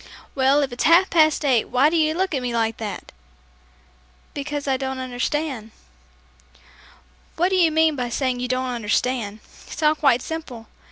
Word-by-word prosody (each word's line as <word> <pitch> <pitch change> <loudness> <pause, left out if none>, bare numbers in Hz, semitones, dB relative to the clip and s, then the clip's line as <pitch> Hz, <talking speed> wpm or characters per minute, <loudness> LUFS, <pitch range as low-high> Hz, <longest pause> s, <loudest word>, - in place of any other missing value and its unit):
"Well, 275 +2 +3
if 270 - -3
it's 245 - -2
half 340 +4 +5
past 310 -2 +3
eight 250 -5 +2
why 275 +5 +2
do - - -1
you 315 -1 +2
look 375 0 -1
at 270 - -1
me 245 -1 -3
like 225 -1 0
that?" 210 -3 -7 1.2
"Because 290 0 -5
I 270 - +2
don't 265 0 -4
understand." 255 -1 -3 1.7
"What 355 +3 +1
do 380 - 0
you 340 -3 +4
mean 320 -1 +3
by 250 -3 -3
saying 255 0 -1
you 250 - -2
don't 255 +1 -1
understand? 225 -1 -2 0.3
It's - - -7
all 300 0 +5
quite 275 -5 +2
simple. 285 -8 -7
270 Hz, 170 wpm, -22 LUFS, 245-310 Hz, 1.7 s, half